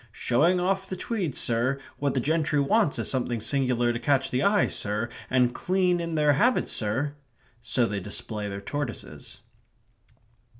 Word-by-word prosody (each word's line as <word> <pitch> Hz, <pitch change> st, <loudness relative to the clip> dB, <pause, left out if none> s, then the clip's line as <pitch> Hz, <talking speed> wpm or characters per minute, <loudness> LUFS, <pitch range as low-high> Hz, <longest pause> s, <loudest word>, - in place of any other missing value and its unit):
"Showing 160 Hz, +13 st, +2 dB
off 190 Hz, +1 st, 0 dB
the 185 Hz, -, -3 dB
tweed, 185 Hz, -, -3 dB
sir; 120 Hz, +4 st, 0 dB, 0.2 s
what 140 Hz, -1 st, 0 dB
the -, -, +2 dB
gentry 155 Hz, +2 st, +1 dB
wants 150 Hz, +4 st, +2 dB
is -, -, -1 dB
something 120 Hz, -3 st, -1 dB
singular 120 Hz, 0 st, +1 dB
to 120 Hz, -, -3 dB
catch 135 Hz, 0 st, +1 dB
the 125 Hz, -, +1 dB
eye, 200 Hz, +5 st, +4 dB
sir 105 Hz, +3 st, -2 dB, 0.2 s
and 125 Hz, -1 st, +3 dB
clean 180 Hz, -1 st, +1 dB
in 170 Hz, -1 st, -3 dB
their 150 Hz, -1 st, +4 dB
habits, 240 Hz, -, +2 dB
sir!" 120 Hz, +7 st, -1 dB, 0.5 s
So 115 Hz, +2 st, +1 dB
they 105 Hz, -3 st, -2 dB
display 105 Hz, +2 st, -4 dB
their 100 Hz, 0 st, -5 dB
tortoises. 140 Hz, +2 st, -5 dB
135 Hz, 160 wpm, -26 LUFS, 120-170 Hz, 0.5 s, eye